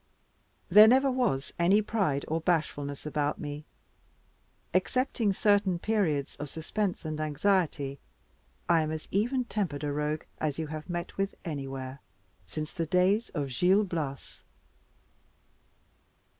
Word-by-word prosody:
There 210 +4 +9
never 265 +3 +5
was 235 - 0
any 185 +5 +5
pride 190 -11 0
or 160 +1 -1
bashfulness 150 -5 -1
about 150 -1 -1
me. 150 0 -6 1.1
Excepting 215 +4 +1
certain 200 -2 +2
periods 170 -9 0
of 145 0 -5
suspense 175 +5 -3
and 155 0 -3
anxiety, 155 -3 0 0.7
I 170 -1 +4
am 155 - -1
as 155 0 -5
even 245 +6 +1
tempered 180 -11 -2
a 145 - -1
Rogue 150 +1 -1 0.2
as 150 -3 -1
you 160 - -2
have 155 +1 -7
met 175 -1 -4
with 195 0 -1
anywhere 135 -3 -5 0.5
since 155 - -5
the 165 -3 -2
days 185 +7 +2
of 145 -3 -1
Gil 185 - +4
Blas. 155 -8 -5
165 Hz, 130 wpm, -29 LUFS, 150-200 Hz, 1.1 s, There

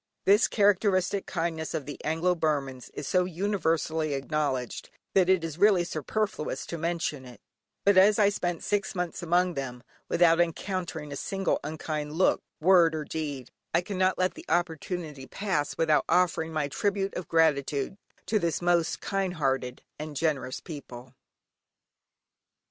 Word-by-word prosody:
This 205 +4 +5
characteristic 200 -2 +2
kindness 165 -2 -2
of 145 - -3
the 145 - -8
Anglo 165 +4 +1
Burmans 140 -6 -2
is 140 - -5
so 180 -1 +2
universally 165 -5 0
acknowledged, 135 -3 -2 0.2
that 185 -2 +4
it 185 -3 +4
is 165 0 -5
really 200 -4 +5
superfluous 180 +2 -3
to 170 - -5
mention 165 -4 -2
it, 125 -2 -12 0.5
but 200 -1 +5
as 205 +2 +6
I 205 -2 +5
spent 175 -4 -2
six 205 -2 -1
months 180 -1 -3
among 175 +1 +2
them, 125 -4 -5 0.3
without 170 -1 +4
encountering 170 -3 -3
a - - -4
single 195 +6 -1
unkind 150 0 -4
look, 185 +4 +3 0.2
word, 170 -1 +5
or 155 - -3
deed, 145 -6 -5 0.2
I 170 - +4
cannot 185 0 0
let 185 0 +1
the 325 - -11
opportunity 165 -4 -2
pass 170 -4 -2
without 155 -2 +3
offering 170 -2 +2
my 155 -2 -1
tribute 195 +6 -1
of 180 - -5
gratitude 150 -2 +1 0.3
to 215 - +1
this 170 -5 0
most 175 -1 +1
kind 195 -2 -1
hearted 135 -4 -1 0.2
and 150 0 -6
generous 140 -4 -1
people. 125 -5 -9
165 Hz, 150 wpm, -28 LUFS, 150-185 Hz, 0.5 s, as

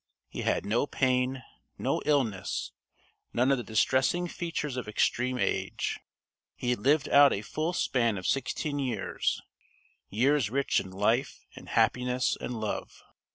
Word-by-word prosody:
He - - -5
had - - 0
no 115 +7 +1
pain, 130 -1 0 0.3
no - - -1
illness, 125 -10 0 0.6
none 125 +3 +3
of 135 - +2
the - - -4
distressing 130 +10 +2
features 165 -6 -4
of 125 -4 -4
extreme 125 +4 +1
age. 95 -5 -1 0.6
He 125 - -1
had 125 - 0
lived 145 +6 +3
out 145 0 +7
a 100 - -2
full 155 +9 -2
span 115 - +1
of 90 - -6
sixteen 145 +2 -1
years 120 -7 -1 0.7
years 130 +2 +2
rich 140 +4 +1
in 95 - -6
life 105 +7 0
and - - -11
happiness 125 0 +2
and 120 -2 -5
love. 110 -1 -4
125 Hz, 145 wpm, -29 LUFS, 110-140 Hz, 0.7 s, out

